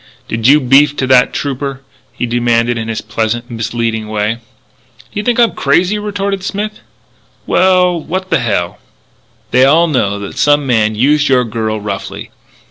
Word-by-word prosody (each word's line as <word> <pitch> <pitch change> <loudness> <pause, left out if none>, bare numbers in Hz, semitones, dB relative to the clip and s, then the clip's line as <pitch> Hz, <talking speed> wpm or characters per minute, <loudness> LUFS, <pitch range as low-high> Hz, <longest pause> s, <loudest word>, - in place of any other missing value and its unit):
"Did 115 +1 -1
you 145 +3 +6
beef 140 +2 +4
to 130 - 0
that 130 -1 +4
trooper?" 135 -1 -4 0.3
he - - -3
demanded 120 0 +1
in 115 -1 -4
his 115 -1 -3
pleasant, 115 +2 -3
misleading 115 -1 -3
way. 110 +2 -2 0.6
"Do - - -8
you - - 0
think 240 +2 0
I'm 235 -1 +4
crazy?" 180 +9 +1
retorted 200 -2 -3
Smith. 210 +2 -4 0.7
"Well, 180 -2 +3
what 185 +3 -4
the 165 - +3
hell 100 -7 -2 0.4
" - - -38
"They 125 +1 +4
all 155 +5 +5
know 120 -10 0
that 100 -1 -7
some 145 -1 +3
man 110 -4 +1
used 145 +6 +2
your 125 -2 +3
girl 110 -1 -3
roughly. 100 -2 -6
125 Hz, 165 wpm, -14 LUFS, 115-165 Hz, 0.7 s, you